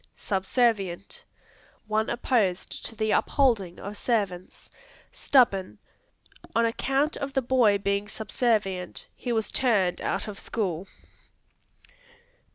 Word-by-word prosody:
Subservient 195 -2 0 0.6
One 215 0 0
opposed 220 -7 0
to 225 - -11
the 215 0 0
upholding 220 -11 +2
of 205 +1 -6
servants. 200 -6 -2 0.4
Stubborn; 195 - +2 0.8
"On 230 0 +4
account 270 +6 0
of 275 -1 -4
the 265 - +2
boy 235 -5 +4
being 200 +1 -1
subservient 210 -5 -1
he 245 - -4
was 220 -2 0
turned 205 -9 +2
out - - -2
of 205 -2 -6
school." 190 -5 -2
215 Hz, 105 wpm, -27 LUFS, 195-240 Hz, 0.8 s, On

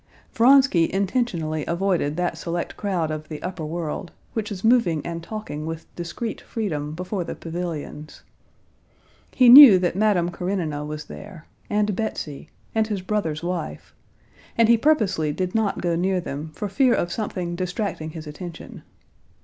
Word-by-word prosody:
Vronsky 255 -8 +5
intentionally 185 - -1
avoided 170 -4 0
that 175 -1 -1
select 170 +1 -4
crowd 180 -6 -1
of 155 0 -6
the 155 -2 -6
upper 180 -2 -4
world, 165 +2 -4 0.2
which 215 -2 -2
was 195 -3 -6
moving 220 - +3
and 170 0 -4
talking 170 -5 -6
with 165 0 -5
discreet 175 +6 -5
freedom 155 -9 -4
before 180 +2 -3
the - - -6
pavilions. 165 -3 -6 1.1
He 255 - +4
knew 250 -5 +11
that 180 -1 0
Madame 195 -4 +2
Karenina 170 -5 -2
was 150 0 -6
there, 190 -5 -11 0.2
and 210 -1 +1
Betsy, 170 -9 -4 0.2
and 220 -1 +1
his 205 -3 -3
brother's 175 -6 -2
wife, 175 -2 -4 0.6
and 230 -1 +5
he 235 - +6
purposely 215 - +2
did 180 +4 -3
not 220 -3 0
go 175 -1 0
near 185 +2 +1
them 150 -2 -5
for 210 - -3
fear 250 +5 +3
of 175 - -1
something 180 -5 -3
distracting 180 -2 -3
his 160 0 -8
attention. 165 +3 -9
180 Hz, 150 wpm, -23 LUFS, 160-210 Hz, 1.1 s, knew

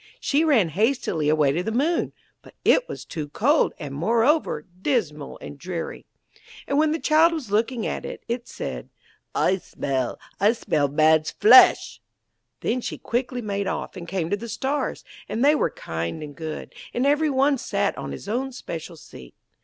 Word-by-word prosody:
She 295 +3 +2
ran 250 - +3
hastily 185 - 0
away 150 -3 +3
to 165 +5 -1
the 220 - -3
Moon, 295 +9 +1 0.3
but - - -17
it - - +4
was - - -7
too 150 -3 -5
cold, 280 - +2
and, 145 -3 -7
moreover, 225 - +1 0.2
dismal 165 - -1
and 145 - -9
dreary. 175 -1 -5 0.6
And 280 - +1
when 310 0 +3
the 320 - 0
child 320 +2 +4
was 280 -11 -5
looking 225 +2 0
at - - -3
it, - - -7
it 235 +1 -3
said: - - -6 0.5
'I 190 - +2
smell, 135 -8 -3 0.2
I 205 +3 +4
smell 155 -11 0
man's 155 +2 +3
flesh!' 245 +5 +6 0.6
Then 250 +2 0
she - - -4
quickly 245 0 -2
made 200 -1 -2
off, - - -4
and 175 -2 -8
came 175 -2 -2
to - - +3
the 230 +3 -8
Stars, 265 +6 -2 0.3
and 230 +5 0
they 295 - +6
were 305 - +1
kind 85 - -5
and 145 -1 -9
good, 160 -2 -6 0.2
and 245 - +1
every 295 +2 +3
one 275 0 +2
sat - - -1
on - - -6
his - - -8
own 255 +5 -2
special 170 - -7
seat. 65 - -13
215 Hz, 175 wpm, -24 LUFS, -, 0.6 s, flesh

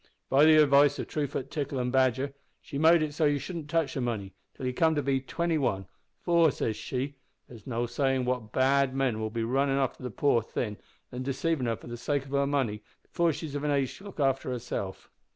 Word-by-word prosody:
By 140 +3 +6
the 155 0 +7
advice 145 -1 +5
o' - - -1
Truefoot 140 -3 -3
Tickle, 145 -3 -3
and 125 -1 -1
Badger, 130 +1 +2 0.3
she 140 -3 -6
made 160 +1 +6
it 150 -1 -3
so 155 +1 +1
that 145 - +4
you - - 0
shouldn't 160 0 -6
touch 160 -3 +1
the 135 - -2
money 105 -6 -3 0.2
till 130 - -6
you 125 - -1
come 160 +4 +3
to 145 - 0
be 135 -1 +1
twenty 165 +3 -1
one, 95 -8 0 0.4
`for,' 170 -3 +5
says 110 -3 -2
she, 135 +5 -4 0.3
`there's 115 -4 -13
no 120 -1 -1
sayin' 130 +1 0
what 125 -4 -2
bad 135 0 +2
men 130 -5 0
will 110 0 -2
be 115 +1 -2
runnin' 135 +3 +1
after 135 -1 -1
the 125 - -4
poor 120 0 +2
thing 105 -1 -4 0.3
an 125 0 -5
deceivin' 135 +1 -1
her 115 - 0
for - - -15
the 120 0 -6
sake 140 +3 -1
of 135 - -12
her 140 0 +2
money 130 -7 0 0.2
before 170 -1 +1
she 155 +2 -5
is 145 - -7
of 145 0 -3
an 150 - 0
age 140 -3 0
to - - -15
look 200 - -10
after 135 -2 +1
herself.' 120 -6 -5
135 Hz, 235 wpm, -28 LUFS, 125-145 Hz, 0.4 s, the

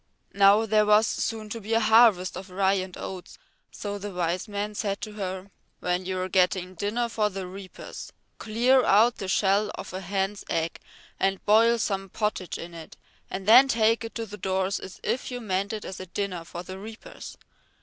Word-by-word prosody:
Now 200 +2 +5
there 215 -1 +3
was 210 +1 +6
soon 220 -1 -2
to 230 +1 -5
be 220 +3 -1
a - - +5
harvest 220 -4 +5
of 185 +2 -8
rye 190 +1 +2
and 185 -2 -3
oats, 185 -2 -8 0.3
so 205 -1 -5
the 205 +1 -5
Wise 180 +2 -2
Man 205 0 -3
said 200 -1 -2
to 215 - -5
her, 190 -1 -5 0.3
"When 180 +1 -1
you 185 -1 -2
are 185 - -2
getting 185 0 +1
dinner 210 +6 -1
for 215 -2 0
the 195 -1 -5
reapers, 185 +1 -9 0.3
clear 245 +4 +3
out 220 +4 +4
the 195 - -5
shell 200 +2 +2
of - - -8
a 185 - -4
hen's 195 +1 -2
egg 165 0 -1 0.4
and 195 0 0
boil 230 +3 +5
some 195 -3 -2
pottage 210 -3 -2
in 170 +1 -8
it, 165 -1 -11 0.3
and 190 +1 -5
then 250 +5 +9
take 230 -2 +2
it 225 -2 -7
to 230 - -3
the 210 -1 -9
door 190 -1 0
as 190 -1 -5
if 255 - -2
you 250 -1 -4
meant 200 -3 -2
it 215 -1 -5
as 190 - -7
a 185 - -7
dinner 185 -2 -3
for 175 +1 -7
the 185 +1 -8
reapers. 220 +2 -10
200 Hz, 200 wpm, -26 LUFS, 185-220 Hz, 0.4 s, then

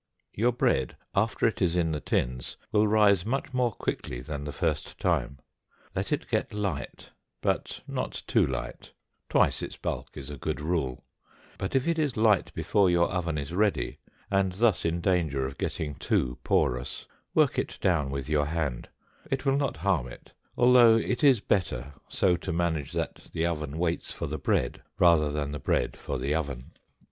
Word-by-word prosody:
Your 120 +4 +2
bread, 65 - +1 0.2
after 110 +3 +1
it 115 - +1
is 90 -2 +2
in 85 -2 +2
the 75 - -1
tins, 60 -3 -2
will 105 0 +4
rise 105 -4 +4
much 130 +5 -2
more 125 -2 +2
quickly - - -4
than 70 +3 -5
the 75 - -4
first - - -2
time. 70 - 0 0.6
Let - - -2
it - - -1
get - - -1
light, 95 -11 -4 0.3
but - - -1
not - - -4
too - - +3
light 60 -2 -4 0.4
twice - - +3
its - - -6
bulk - - -4
is 70 +1 -7
a 70 - -8
good 65 - -2
rule; 75 -5 -2 0.5
but 95 +7 -3
if 135 +2 +2
it 165 -1 +1
is 145 -7 0
light 110 -3 +3
before 100 -3 +3
your 85 0 +3
oven 85 -4 -1
is 75 +2 -4
ready, 105 +2 0 0.3
and 95 -1 +2
thus 105 -2 +2
in 85 +1 0
danger 80 -8 +1
of 65 +1 -6
getting 75 -2 -2
too 60 -2 -1
porous, 60 +1 0 0.3
work - - +4
it - - -3
down 80 -7 +2
with 70 0 -4
your 75 -1 +1
hand, 75 -6 -2 0.4
it 135 +1 -2
will 135 0 +3
not 140 - 0
harm 85 -6 +1
it, - - -13 0.2
although 120 -2 +7
it 120 +4 0
is 135 -7 +6
better 85 -8 -1
so 90 -2 +2
to - - -5
manage 80 -4 -1
that 85 -1 -4
the 80 - 0
oven 75 -3 -2
waits 85 0 -1
for - - -4
the 75 +1 -4
bread 60 -2 0 0.2
rather 80 -4 +5
than 75 -1 -2
the 75 - -4
bread - - 0
for - - -4
the 70 - -1
oven. 70 -6 -3
85 Hz, 180 wpm, -28 LUFS, 70-105 Hz, 0.6 s, although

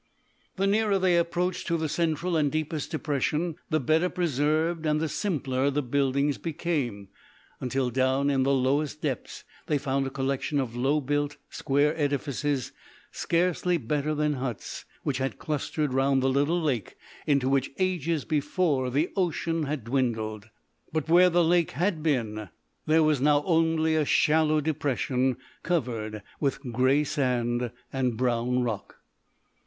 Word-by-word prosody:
The 195 - 0
nearer 205 0 +2
they 185 -2 +3
approached 170 +2 0
to 170 -2 +1
the 160 -1 -1
central 165 +2 0
and 150 -3 +2
deepest 155 -1 -2
depression, 155 +1 -1
the 155 - +2
better 160 +6 +2
preserved 160 0 0
and 150 0 +2
the 160 - 0
simpler 140 -8 -1
the 145 +1 -1
buildings 140 +2 +1
became, 140 - -3 0.5
until 130 0 -1
down 130 +3 +2
in 135 -1 +2
the 135 +1 +2
lowest 140 +3 0
depths 135 -5 -3 0.2
they 150 - +2
found 135 -1 -1
a - - -2
collection 135 +2 -1
of 120 -3 -3
low 135 +5 +1
built 145 +1 -1
square 145 +3 +1
edifices, 145 -2 -1 0.4
scarcely 175 +1 +1
better 150 +3 -1
than 150 0 +1
huts, 125 -5 -5 0.2
which 135 -3 -1
had 135 0 -2
clustered 150 -1 -2
round 135 0 +2
the 135 - +3
little 145 +6 +2
lake 135 - -2 0.3
into 140 -3 +2
which, 135 -1 +1
ages 170 -4 0
before, 150 -3 0
the 145 +7 0
ocean 165 -3 0
had 145 -4 -3
dwindled. 110 -4 -2 0.4
But 155 0 -2
where 180 +2 +7
the 175 0 +3
lake 170 0 +2
had 170 +3 0
been 110 - -1 0.4
there 160 +1 +5
was 155 -4 +2
now 145 0 +4
only 160 -2 +2
a 155 -1 +2
shallow 155 0 +3
depression 135 -4 0 0.2
covered 115 - -2 0.2
with 140 -3 0
grey 130 +5 +3
sand 125 -4 0 0.2
and 125 -4 0
brown 125 0 +1
rock. 110 -5 -4
145 Hz, 150 wpm, -27 LUFS, 130-160 Hz, 0.5 s, where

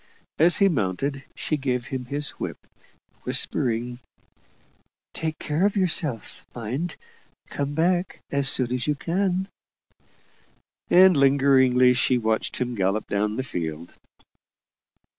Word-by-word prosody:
As 170 +3 +5
he 200 - +4
mounted, 135 - -2
she 155 - -2
gave 125 -3 -2
him 125 0 -5
his 145 +3 -1
whip, - - -6 0.6
whispering 120 0 0 1.1
"Take 160 -1 -4
care 150 +4 -2
of 205 +1 +2
yourself, 160 - 0
mind. 130 +9 -4 0.6
Come 145 0 -3
back 175 +3 0
as 140 -1 +1
soon 125 -2 +2
as 125 +2 -2
you 150 - +1
can." 185 +4 -1 1.4
And 185 0 +6
lingeringly 135 -2 +4
she 125 0 +1
watched 110 -1 -1
him 125 -1 -2
gallop 100 0 -1
down 105 +1 -1
the 130 - -2
field. 85 -8 -6
135 Hz, 120 wpm, -24 LUFS, 120-160 Hz, 1.4 s, And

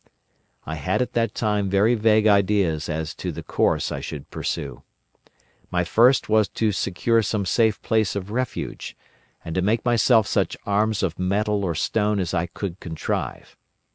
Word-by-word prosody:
"I 80 +2 -5
had 75 - 0
at - - -8
that 115 -2 0
time 105 -3 0
very 100 +5 +3
vague 110 -1 +3
ideas 100 -6 +2
as 80 0 -3
to - - -4
the - - -7
course - - 0
I - - -3
should 75 -3 -8
pursue. - - -4 0.9
My 90 0 0
first 120 +9 +4
was 110 -1 +3
to 110 +2 0
secure 105 +4 +1
some 105 -1 -1
safe 110 +3 +2
place 110 -4 +1
of 100 0 -5
refuge, 125 +1 -4 0.5
and 80 - -5
to 95 - 0
make 110 +6 0
myself 120 -2 +4
such - - 0
arms 105 +1 +1
of 85 -3 -2
metal 100 +2 0
or 85 -4 -1
stone 105 +5 0
as 90 -3 -2
I 85 +1 0
could 95 +1 -6
contrive. 80 -2 -4
105 Hz, 170 wpm, -23 LUFS, 90-110 Hz, 0.9 s, first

